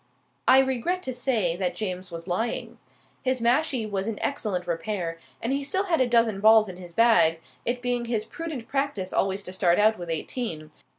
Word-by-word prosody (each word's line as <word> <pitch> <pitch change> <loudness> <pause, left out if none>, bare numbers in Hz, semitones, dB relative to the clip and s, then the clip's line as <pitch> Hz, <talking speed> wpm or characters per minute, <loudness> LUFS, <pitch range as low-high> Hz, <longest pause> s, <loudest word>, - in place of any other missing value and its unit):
I 260 - +8
regret 270 +8 +1
to 260 - -3
say 230 -9 +1
that 185 -1 -1
James 185 -3 -4
was 170 0 -8
lying. 220 +6 -2 0.4
His 255 0 0
mashie 250 +1 +1
was 200 -1 -2
in 225 -2 -3
excellent 205 -10 -2
repair, 170 -1 -3 0.2
and 235 +4 0
he 280 +1 -1
still 375 +8 0
had 340 -7 +1
a 255 - +3
dozen 230 -4 +3
balls 220 0 +6
in 185 -2 -8
his 175 -2 -10
bag, 170 -6 +4 0.3
it 245 +1 -1
being 245 -1 0
his 225 -2 -1
prudent 315 -9 -6
practice 275 -10 -2
always 195 +1 0
to 185 - -7
start 175 -2 +3
out 215 0 +3
with 175 -1 -6
eighteen. 160 -2 -3
220 Hz, 190 wpm, -26 LUFS, 185-255 Hz, 0.4 s, I